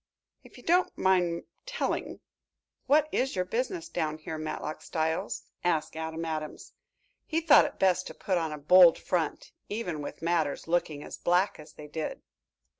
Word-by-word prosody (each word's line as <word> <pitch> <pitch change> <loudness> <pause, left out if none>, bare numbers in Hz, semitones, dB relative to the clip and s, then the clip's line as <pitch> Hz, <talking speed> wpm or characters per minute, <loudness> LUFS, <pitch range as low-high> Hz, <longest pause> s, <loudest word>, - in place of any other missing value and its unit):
"If - - -16
you - - -14
don't 355 +2 +2
mind 180 -3 +2 0.2
telling, - - -2 0.7
what 300 +2 +4
is 265 -2 0
your 185 -1 0
business 260 - -2
down 155 - -2
here, 155 0 -6
Matlock 155 0 -4
Styles?" 160 -1 -2 0.2
asked 160 -3 0
Adam 160 +1 -4
Adams. 155 -1 -5 0.5
He 320 - +1
thought 325 -3 +7
it 290 - -6
best 185 -1 +2
to - - -9
put 185 -3 0
on 160 -2 -2
a 150 - -5
bold 170 +3 +7
front, 170 -4 -2 0.2
even 180 -8 -3
with 145 - -7
matters 165 -4 0
looking 165 -4 0
as - - -8
black 180 +2 +2
as 150 +1 -12
they 150 - -11
did. 155 +1 -5
170 Hz, 165 wpm, -29 LUFS, 155-190 Hz, 0.7 s, thought